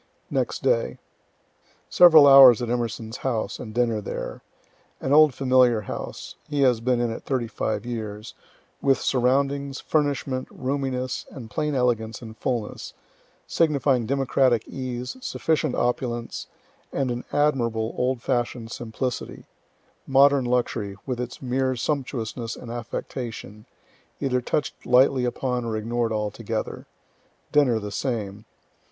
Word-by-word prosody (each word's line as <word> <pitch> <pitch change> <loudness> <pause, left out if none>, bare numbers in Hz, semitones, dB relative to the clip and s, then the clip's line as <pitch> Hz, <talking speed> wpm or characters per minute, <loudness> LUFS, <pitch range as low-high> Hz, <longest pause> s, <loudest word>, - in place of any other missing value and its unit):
Next - - -1
Day. - - +1 0.9
Several 160 -4 +8
hours 135 -4 +9
at 120 - -3
E.'s 115 -1 -3
house, 120 -5 -2
and 110 - -7
dinner 115 -2 0
there. - - -6 0.6
An 135 - -1
old 150 -2 +6
familiar 125 -4 +3
house, - - -7
(he 145 -1 0
has 125 -4 +3
been 125 0 +1
in 120 -1 0
it 115 - -6
thirty 130 -3 -1
five 110 -1 -3
years,) 110 -2 -6 0.5
with 135 -1 +3
surroundings, 135 +2 0
furnishment, 140 -3 -1
roominess, 130 -1 -3
and 115 -5 -10
plain 150 +6 -1
elegance 115 -3 0
and 110 -2 -10
fullness, 115 -2 -4 0.5
signifying 140 -7 +1
democratic 130 -3 +2
ease, 125 - -5
sufficient 160 - -1
opulence, 120 -1 -2 0.4
and 135 -2 -1
an 120 0 -4
admirable 120 -6 +1
old 125 -1 -1
fashioned 120 -2 -2
simplicity 120 +2 -5 0.6
modern 140 0 +5
luxury, 120 -5 -1
with 125 -3 -3
its 125 +2 -6
mere 130 +1 0
sumptuousness 120 -4 -3
and 115 - -9
affectation, 115 -2 -6 0.5
either 125 -3 0
touch'd 150 +4 -2
lightly 125 +1 +4
upon 125 0 -2
or 115 -2 -2
ignored 115 +1 -1
altogether. 105 -1 -3 0.6
Dinner 140 -6 +4
the 105 -1 -5
same. 105 -4 -3
125 Hz, 125 wpm, -24 LUFS, 115-135 Hz, 0.9 s, hours